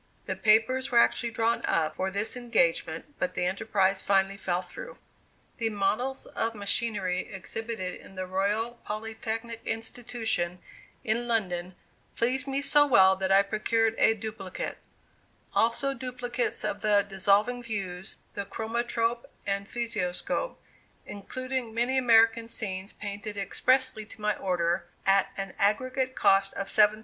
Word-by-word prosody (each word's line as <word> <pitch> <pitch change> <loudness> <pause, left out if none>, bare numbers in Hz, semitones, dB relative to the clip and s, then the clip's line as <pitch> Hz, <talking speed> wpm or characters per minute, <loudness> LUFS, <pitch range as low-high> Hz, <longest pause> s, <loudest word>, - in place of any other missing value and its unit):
The - - -2
papers 230 +5 +3
were 240 - +2
actually 235 0 +4
drawn 230 +1 +1
up 160 -2 +1
for 190 - -1
this 205 +4 -1
engagement, 220 - 0
but 275 - -1
the 180 - 0
enterprise 195 0 +1
finally 195 0 +2
fell 180 -2 -1
through. - - -9 0.6
The 225 -1 +1
models 220 +6 -1
of 230 0 -2
machinery 200 -3 -1
exhibited 195 0 -4
in 195 - -14
the 185 0 -3
Royal 205 +6 -1
Polytechnic 225 +1 -4
Institution 225 -6 -2 0.5
in 235 +2 0
London, 185 -6 -1 0.4
pleased 255 +4 0
me 275 +1 -1
so 295 +1 +6
well 190 -7 +6
that 190 0 -1
I 195 +1 +7
procured 225 +2 +1
a 225 - +5
duplicate; 210 -3 -5 0.7
also 235 +4 +2
duplicates 250 -1 -3
of - - -2
the 205 -2 +4
"Dissolving 200 +5 +2
Views," 195 -5 -5 0.2
the 200 - -4
Chromatrope 235 +2 -1 0.2
and 200 0 -1
Physioscope, 230 - -2 0.5
including 255 +3 -4
many 250 +3 +2
American 230 -2 +5
scenes 195 -4 -3
painted 205 0 -6
expressly 220 +3 +1
to 220 - -13
my 210 0 +1
order, 175 -1 0 0.2
at 195 0 +4
an 195 -1 -4
aggregate 255 +5 +1
cost 195 0 +3
of 195 - -3
$7,000. 215 0 +4
220 Hz, 135 wpm, -28 LUFS, 195-235 Hz, 0.7 s, I